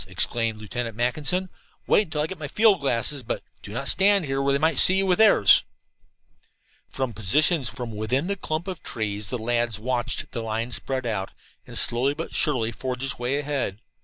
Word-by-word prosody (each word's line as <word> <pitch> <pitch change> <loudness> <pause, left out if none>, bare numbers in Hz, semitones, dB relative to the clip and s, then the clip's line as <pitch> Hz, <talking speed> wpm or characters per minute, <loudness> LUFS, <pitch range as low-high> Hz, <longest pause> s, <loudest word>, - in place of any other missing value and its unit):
exclaimed 115 -2 -1
Lieutenant 115 +1 -5
Mackinson. 150 +10 0 0.4
"Wait 210 - +3
until 150 -2 -2
I - - 0
get 190 +1 -7
my 150 - -5
field 210 +3 +3
glasses, 135 +1 +1
but 115 - -4 0.2
do 100 - -9
not 135 +5 -4
stand 195 -3 +4
where 135 +1 0
they 140 - +3
might 155 -1 +2
see 185 - +6
you 195 - +2
with 185 0 +1
theirs." 215 - +6 1.3
From 130 -3 -3
positions 140 - +2
within 120 +3 -2
the 200 +2 -2
clump 160 -1 -4
of 185 -3 -6
trees 105 -2 -3
the 125 - -2
lads 120 -1 -1
watched 120 +2 -2
the 115 - -4
line 115 +2 -3
spread 130 +1 -1
out 100 -4 -3 0.3
and - - -4
slowly 130 +4 +2
but 165 +2 -6
surely 125 -7 +1
forge 125 +2 -5
its 135 -2 -3
way 125 +3 -1
ahead. 140 -8 -3
130 Hz, 185 wpm, -24 LUFS, 115-155 Hz, 1.3 s, see